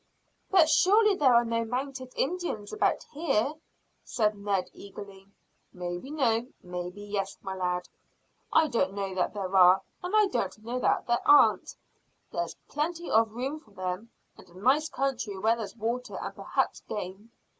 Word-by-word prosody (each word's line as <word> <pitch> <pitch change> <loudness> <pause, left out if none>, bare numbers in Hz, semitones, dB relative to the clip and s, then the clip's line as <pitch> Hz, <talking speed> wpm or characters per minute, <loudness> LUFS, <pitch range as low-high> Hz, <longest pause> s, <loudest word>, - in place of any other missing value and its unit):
"But 360 -5 +6
surely 410 +7 +5
there 270 -9 +4
are 235 0 +5
no 230 0 0
mounted 255 +2 -4
Indians 335 - -2
about 430 - +1
here?" 280 -4 +1 0.5
said 215 -2 0
Ned 200 -2 -1
eagerly. 200 -1 -11 0.5
"Maybe 175 +6 -5
no, 245 -6 +1 0.2
maybe 180 +2 -6
yes, 205 -1 -3
my 190 - -4
lad. 180 -1 -2 0.6
I 320 - +5
don't 200 -7 0
know 195 -1 -3
that 185 +2 -1
there 195 -1 -3
are, 185 0 +7 0.2
and 360 +4 -2
I 425 -1 +6
don't 235 - -2
know 245 +2 -2
that - - +1
there 240 +1 +1
aren't. 290 - +5 0.6
Here's - - -3
plenty 335 +4 -3
of 220 0 +3
room 270 +5 -3
for 235 - -24
them, 185 +2 -5 0.3
and - - -15
a 175 - -16
nice 275 +9 +2
country 250 -7 -2
where 220 +4 +2
there's 220 -2 -6
water 235 +3 -3
and - - -5
perhaps - - -1
game. 205 +3 -6
230 Hz, 160 wpm, -28 LUFS, 195-275 Hz, 0.6 s, are